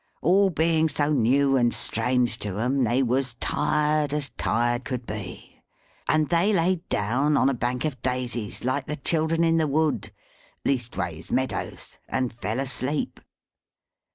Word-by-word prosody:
All 195 +4 +4
being 160 -1 +2
so 145 +1 0
new 135 +1 +3
and 120 -2 +3
strange 120 +1 +1
to 100 -2 -4
'em, 130 +4 +1
they 120 +4 +2
was 130 0 0
tired 150 +3 0
as 145 -3 -2
tired 120 +2 0
could 125 -2 -4
be. 105 -4 -8 0.5
And 155 -1 +2
they 175 +5 +3
laid 180 -2 0
down 135 +9 +1
on 130 - +4
a - - +1
bank 125 +2 -2
of 135 -6 -3
daisies, 125 -4 -2
like 130 +2 -1
the 150 - -2
children 160 +3 +1
in 165 0 +3
the 160 -1 +2
wood, 155 +1 0 0.6
leastways 95 - -2
meadows, 130 +1 -3
and 130 -2 -1
fell 115 +1 -3
asleep. 135 +2 -1
135 Hz, 150 wpm, -25 LUFS, 120-155 Hz, 0.6 s, All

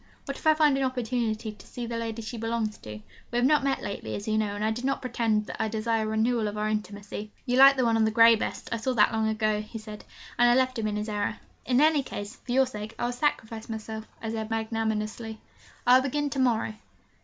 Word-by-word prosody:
What 275 - -4
if - - -4
I 310 - +6
find 300 -3 +4
an - - +1
opportunity 235 -4 -1
to 210 - -16
see 245 -2 -6
the 230 0 -4
lady 230 0 -4
she 220 +3 -6
belongs 225 -1 -2
to 105 0 -8 0.3
we 240 - -2
have 245 - +3
not 295 +1 +4
met 275 -1 0
lately, 200 - -4
as 205 - -6
you 215 - +1
know, 210 -2 0
and 210 +1 -2
I 220 - +2
do 230 +2 -3
not 275 +1 0
pretend 230 -4 0
that - - -5
I 220 - +1
desire 220 0 0
a - - -3
renewal 220 +1 +1
of 210 0 -4
our 210 0 0
intimacy 210 0 -4
' - - -35
'You 245 0 +1
like 275 +1 +9
the 255 - +2
one 230 -1 +3
on 225 - +3
the - - +3
grey 230 +1 +7
best; 220 - -4
I 230 - 0
saw 255 +3 -1
that 220 -1 +4
long 220 0 +1
ago,' 215 -1 0
he 215 +2 -8
said; 215 -1 -9 0.4
and 240 0 +6
I 240 - +5
left 255 -1 +1
him 215 - 0
in 210 - -2
his 210 +1 -3
error. 210 0 -2 0.3
'In 250 0 +3
any 305 0 +5
case, 205 -3 -7
for 245 - -8
your 265 +2 +4
sake, 215 -2 -7
I - - -1
will 240 - 0
sacrifice 230 -4 -2
myself,' 220 0 -6 0.2
I 225 - -2
said 220 -1 -4
magnanimously. 220 0 -2 0.5
'I 245 - +7
will - - +3
begin 290 +1 -1
to 275 - -2
morrow. 230 -4 +1
225 Hz, 260 wpm, -27 LUFS, 215-245 Hz, 0.5 s, like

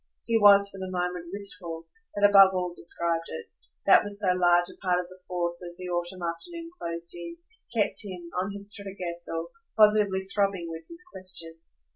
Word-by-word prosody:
He 230 - 0
was, 200 -2 +7
for 195 - -9
the 190 0 -5
moment, 180 -1 -3
wistful 175 -4 0 0.3
that 205 0 +5
above 195 -2 +7
all 180 -1 -2
described 170 -1 0
it; 465 -1 -8 0.3
that - - +7
was 205 0 -3
so 190 -3 +2
large 175 -1 +4
a - - -11
part 180 -1 +2
of 180 - -4
the 185 0 -15
force 175 -1 -2
that, 180 - -8
as 175 0 -7
the 180 0 -7
autumn 175 +1 -3
afternoon 330 - -6
closed 170 0 -4
in, 175 - -7 0.3
kept 225 -1 +1
him, 180 -4 -7
on 185 +2 -1
his 200 +1 -9
traghetto, 175 -4 -6 0.3
positively 210 -3 +4
throbbing 195 -3 -1
with 165 0 -8
his 340 +2 -3
question. 170 -3 -3
185 Hz, 185 wpm, -27 LUFS, 175-200 Hz, 0.3 s, was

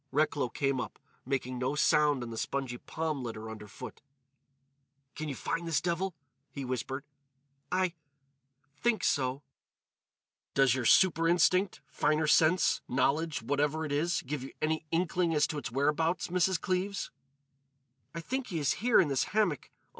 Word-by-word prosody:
Recklow 145 -2 +1
came 135 +1 0
up, 115 - -7 0.3
making 130 -2 -2
no 130 +3 -1
sound 150 -3 +3
on 115 - -6
the - - -6
spongy 130 -3 -3
palm 155 -3 -3
litter 110 -2 -6
underfoot. 105 -1 -9 1.1
"Can 155 -1 -5
you 140 - -4
find 170 +5 -3
this 160 -5 +2
devil?" 175 +3 -2 0.3
he 140 -2 -6
whispered. 130 +2 -3 0.7
"I—think 145 - -3
so." 130 0 0 1.1
"Does 135 -3 +5
your 130 -2 -2
super 165 +3 +5
instinct—finer 170 -3 +2
sense—knowledge—whatever 150 -2 +2
it 150 - -5
is—give 150 -2 -1
you 135 - -7
any 155 +1 -1
inkling 170 0 +1
as 150 - +4
to 150 - -4
his 145 - -5
whereabouts, 150 +7 +1
Mrs. 180 0 +2
Cleves?" 185 +2 -2 1.0
"I 165 - -3
think 260 +7 -3
he 175 - -3
is 145 -3 +2
here 240 0 +5
in 180 - +4
this 135 -2 +1
hammock. 205 -9 0
150 Hz, 135 wpm, -30 LUFS, 135-170 Hz, 1.1 s, Does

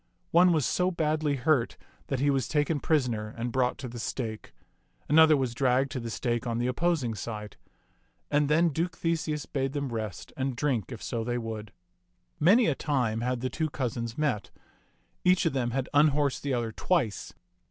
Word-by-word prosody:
One 175 +2 +6
was 155 -6 +2
so 180 +8 +1
badly 155 -4 0
hurt 130 -2 +1 0.3
that 135 - -1
he 140 +1 +3
was 135 -4 0
taken 150 0 +1
prisoner 120 -9 0
and 120 +1 -2
brought 125 0 +1
to 130 - -6
the 120 0 -8
stake; 110 -2 -4 0.6
an 150 +2 +5
other 160 -2 +7
was 130 -3 -1
dragged 130 +1 +2
to 130 - -3
the 115 -1 -5
stake 120 +1 -2
on 115 -1 -1
the 120 - 0
opposing 130 -2 0
side. 105 0 -6 0.8
And 145 -1 +2
then 165 +3 +4
Duke 165 +2 -2
Theseus 160 -3 -1
bade 135 -1 -2
them 140 -4 -3
rest 110 -7 -5
and 130 -1 -2
drink 130 -3 -1
if 115 - -7
so 115 -2 -2
they 120 +1 -1
would. 110 -2 -5 0.7
Many 205 +10 +5
a 155 - +2
time 125 -7 -1
had 125 0 -1
the 130 - -1
two 160 -1 -1
cousins 115 -4 -3
met. 145 -9 -1 0.7
Each 180 0 +4
of 165 - +1
them 125 -3 0
had 130 +1 -2
unhorsed 145 -1 +3
the 140 -2 -1
other 115 -2 -2
twice. 130 - -1
135 Hz, 185 wpm, -28 LUFS, 120-150 Hz, 0.8 s, other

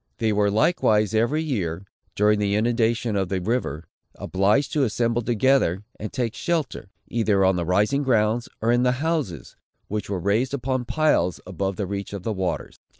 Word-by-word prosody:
They 110 -3 +1
were, 105 0 +2
likewise, 110 - +2
every 120 +8 +1
year, 95 - -3 0.3
during 105 0 +3
the 100 -1 +1
inundation 115 0 +1
of 95 -2 0
the 95 -1 -1
river, 90 - -2 0.3
obliged 105 +9 +1
to 150 - +2
assemble 115 0 0
together, 115 -5 +2 0.2
and 110 - -5
take 120 -3 -2
shelter, 160 - -2 0.2
either 105 -4 +2
on 95 0 +3
the 85 -1 -1
rising 105 - +2
grounds, 115 -3 +1
or 115 - +3
in 120 0 +3
the 125 0 +3
houses, 135 - -3 0.3
which 105 0 -3
were 100 - -1
raised 110 +9 0
upon 130 -1 -2
piles, 155 - +1
above 95 +1 -3
the 100 - -2
reach 100 +1 -5
of 100 -3 -6
the 110 - -1
waters. 95 -3 -3
110 Hz, 175 wpm, -24 LUFS, 100-125 Hz, 0.3 s, during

